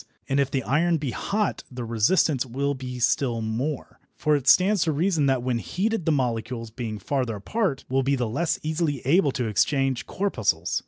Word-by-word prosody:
And 135 +1 +1
if 140 -1 +2
the 135 -2 -1
iron 165 +6 +2
be 140 -4 -3
hot 210 - -1
the 125 -2 -6
resistance 120 - +2
will 140 +3 -2
be 130 -2 -6
still 120 0 +1
more, 120 +7 -3 0.2
for 150 0 +2
it 140 -2 -3
stands 195 +1 +5
to 160 - +1
reason 160 -1 +1
that 130 -2 +1
when 125 -2 0
heated 195 - -2
the - - +4
molecules, 115 -4 -2
being 115 -2 -5
farther 125 -1 -2
apart, 155 - -2
will 135 +1 +1
be 135 +1 +1
the 125 -3 -1
less 165 +9 0
easily 155 -3 -1
able 150 +1 +4
to 125 - -2
exchange 135 +4 +1
corpuscles. 185 - 0
135 Hz, 190 wpm, -25 LUFS, 120-160 Hz, 0.2 s, stands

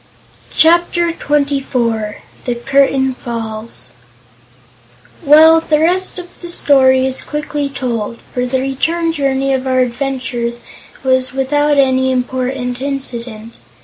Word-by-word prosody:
Chapter 345 +1 +3
Twenty 290 -3 0
Four 230 -5 -2 0.2
The 245 - -1
Curtain 270 +1 +2
Falls 225 - -6 1.3
Well, 320 +3 +7
the 305 -2 +1
rest 360 +5 +1
of 360 -1 -10
the 345 - -7
story 260 -5 +4
is 265 0 -2
quickly 295 -1 -3
told, 235 -4 -3 0.2
for 250 0 -1
the 260 +1 0
return 325 +5 -1
Journey 275 -2 0
of 265 0 -2
our 255 0 +2
adventurers 245 -2 -3 0.4
was 260 -1 +1
without 290 +2 +1
any 260 -1 +3
important 255 0 -2
incident. 240 -5 -4
265 Hz, 115 wpm, -15 LUFS, 250-290 Hz, 1.3 s, Well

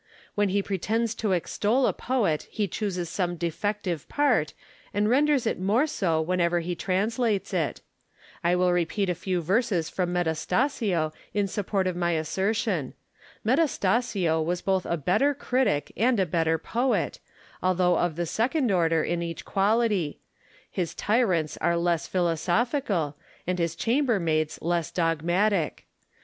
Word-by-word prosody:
When 205 -1 +1
he 200 +1 +1
pretends 220 +4 -1
to 220 -3 -2
extol 210 +8 +1
a - - +2
poet 210 - 0
he 210 -2 -1
chooses 185 -2 -3
some 175 0 -2
defective 175 0 -3
part, 255 - +1 0.4
and 205 +1 +2
renders 280 +2 +3
it 225 - -1
more 210 +9 +2
so 190 - 0
whenever 175 +1 +1
he 175 +2 -3
translates 205 +4 0
it. - - -1 0.6
I 175 +1 +3
will 180 0 +3
repeat 180 +3 0
a - - +1
few 180 0 -2
verses 190 -2 +1
from 180 -2 -1
Metastasio 175 - 0 0.2
in 205 -1 +2
support 195 0 -1
of 185 -1 -1
my 175 -1 0
assertion. 190 - -1 0.5
Metastasio 220 - +1
was 175 +2 -2
both 190 -2 0
a 170 - 0
better 225 - +2
critic 250 - 0
and 235 +3 +2
a 190 - +3
better 165 -2 +1
poet, 245 +9 -1 0.4
although 180 -1 +2
of 175 -3 0
the 175 +1 -1
second 245 - 0
order 165 -3 +2
in 175 0 -1
each 170 -1 -5
quality; 200 -5 +1 0.5
his 175 -3 -3
tyrants 190 -9 +1
are 170 0 +1
less 170 -1 0
philosophical, 175 - 0 0.3
and 180 0 -1
his 170 -1 0
chambermaids 195 - +1
less 170 -1 0
dogmatic. 175 +2 0
185 Hz, 140 wpm, -26 LUFS, 170-220 Hz, 0.6 s, renders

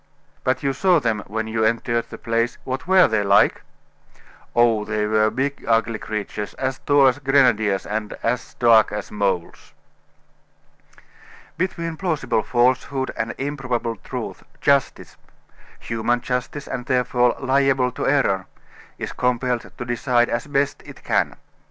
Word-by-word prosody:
"But 130 +3 0
you 135 -1 +1
saw 180 +4 +3
them 115 -6 -1
when 110 +2 -3
you 110 0 -1
entered 115 +1 0
the - - -8
place 115 0 -1
what 130 +3 -4
were 190 0 +6
they 110 -2 +1
like?" 100 +1 +4 0.9
"Oh! 115 -3 +4
they 105 0 -1
were 110 0 +3
big, 135 +5 -3
ugly 115 -1 +1
creatures, 105 -1 -5
as 130 0 -3
tall 145 -1 +4
as 130 +1 +3
grenadiers, 120 -8 +2
and 105 0 -3
as 125 +2 -2
dark 115 -3 +5
as 105 0 -5
moles!" 100 -4 -2 1.8
Between 170 -2 -3
plausible 160 - 0
falsehood, 130 +3 +1
and - - -3
improbable 130 -4 -2
truth, - - -6 0.2
justice 140 -2 0 0.6
human 120 +1 -1
justice, 125 +3 -3
and 125 -2 -5
therefore 125 -1 +2
liable 135 -1 +2
to - - -3
error 130 -9 +1 0.5
is - - -5
compelled 125 -1 -1
to 120 - -5
decide 120 0 +1
as 120 +4 -2
best 140 -1 0
it - - -13
can. - - 0
120 Hz, 140 wpm, -22 LUFS, 110-135 Hz, 1.8 s, were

